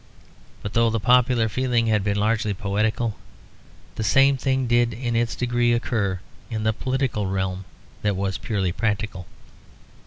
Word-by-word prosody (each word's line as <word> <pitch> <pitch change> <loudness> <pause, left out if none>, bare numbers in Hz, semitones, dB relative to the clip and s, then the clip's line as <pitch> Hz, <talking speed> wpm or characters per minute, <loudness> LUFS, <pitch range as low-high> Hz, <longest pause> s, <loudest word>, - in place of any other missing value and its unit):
But 105 - -5
though 115 0 +3
the 115 0 0
popular 125 0 +3
feeling 120 0 0
had 105 -3 +2
been 100 0 0
largely 105 -1 +1
poetical, 105 +3 -1 0.8
the - - -1
same 135 +7 +4
thing 130 0 0
did 120 -1 +2
in 120 0 -2
its 115 0 0
degree 120 -1 +1
occur 105 -6 -1 0.3
in 110 -2 -3
the 110 0 +2
political 130 -4 -1
realm 95 0 -2 0.4
that 105 -1 0
was 95 0 -2
purely 100 -5 -1
practical. 105 -2 -2
110 Hz, 150 wpm, -23 LUFS, 100-120 Hz, 0.8 s, same